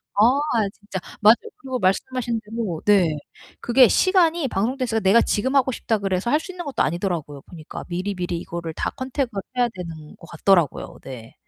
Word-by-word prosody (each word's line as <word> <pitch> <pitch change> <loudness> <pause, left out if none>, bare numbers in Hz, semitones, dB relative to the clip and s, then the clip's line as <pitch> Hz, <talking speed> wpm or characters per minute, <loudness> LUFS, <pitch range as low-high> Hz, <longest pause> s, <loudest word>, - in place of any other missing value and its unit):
아 240 -1 +3
진짜 205 -3 -7 0.2
맞아요. 215 +2 +8 0.2
그리고 260 -10 -4
말씀하신 235 +4 0
대로 210 -7 -4
네. 185 -7 +4 0.4
그게 245 0 +5
시간이 340 -6 +3
방송댄스가 235 +2 -1
내가 205 +4 +5
'지금 260 +7 0
하고 260 -1 +3
싶다.' 220 -1 -1
그래서 195 +3 -1
할 300 - +4
수 370 - -8
있는 355 -1 -7
것도 285 -3 0
아니더라고요 165 -3 -2
보니까. 160 -3 -9
미리미리 180 -1 -3
이거를 170 -2 -6
다 - - -2
컨택을 260 -5 -3 0.2
해야 245 -1 +3
되는 160 -4 -8
것 - - -14
같더라고요. 170 -2 +1
네. 120 -4 -10
210 Hz, 385 characters per minute, -23 LUFS, 175-255 Hz, 0.4 s, 맞아요